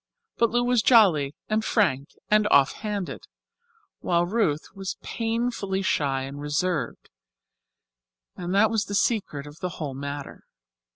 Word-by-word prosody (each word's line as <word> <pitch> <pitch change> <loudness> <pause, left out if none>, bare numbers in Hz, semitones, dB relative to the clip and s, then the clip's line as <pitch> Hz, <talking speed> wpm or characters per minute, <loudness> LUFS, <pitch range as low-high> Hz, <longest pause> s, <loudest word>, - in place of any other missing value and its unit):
But 235 - +3
Lou 240 +2 +1
was 245 -1 +3
jolly 175 - +4
and 215 +1 0
frank 150 - +1 0.2
and 210 0 +3
offhanded, 200 +7 +1 0.7
while 170 -1 +1
Ruth 175 -7 0
was 195 -1 -5
painfully 225 -4 -2
shy 135 -6 0
and 140 +2 -7
reserved, 150 -2 -2 1.2
and 175 0 -5
that 215 +2 +4
was 225 -1 0
the 205 - -4
secret 200 -10 0
of 145 +2 -12
the 180 -1 -4
whole 145 -4 -4
matter. 140 +1 -7
185 Hz, 130 wpm, -25 LUFS, 145-215 Hz, 1.2 s, jolly